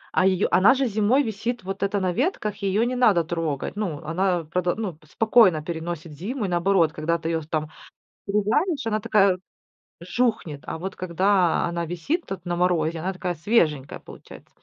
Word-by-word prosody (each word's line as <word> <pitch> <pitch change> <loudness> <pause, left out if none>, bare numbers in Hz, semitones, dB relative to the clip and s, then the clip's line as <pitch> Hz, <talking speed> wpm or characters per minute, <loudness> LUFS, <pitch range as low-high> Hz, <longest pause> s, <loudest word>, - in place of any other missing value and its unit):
А 185 - +4
её 190 0 +2
она 210 +9 +6
же 270 0 +1
зимой 225 +5 +2
висит 225 +1 -3
вот 195 +1 -5
это 200 0 0
на 185 -1 0
ветках, 240 - -1
её 200 +2 +1
не 250 +1 -1
надо 210 -9 +4
трогать. 160 -1 -3
Ну, 180 -9 -3
она 175 +1 0
продо 175 +2 -1
ну, 205 -7 -4
спокойно 190 -3 +4
переносит 165 -1 -5
зиму 210 - -4
и - - -1
наоборот, 175 -2 +2
когда 165 +2 -1
ты 165 0 -4
её 165 -1 -1
там 155 0 -3 0.6
срезаешь, 225 - 0
она 215 -1 0
такая, 195 -3 +3 0.6
жухнет. 180 - -1
А - - -4
вот 190 +3 -6
когда 185 0 +2
она 170 0 -2
висит 175 - -2
тут 185 -3 -7
на 175 0 -1
морозе, 170 -2 +1
она 185 +4 -2
такая 180 -1 -4
свеженькая 155 - +1
получается. - - -14
185 Hz, 175 wpm, -24 LUFS, 165-210 Hz, 0.6 s, она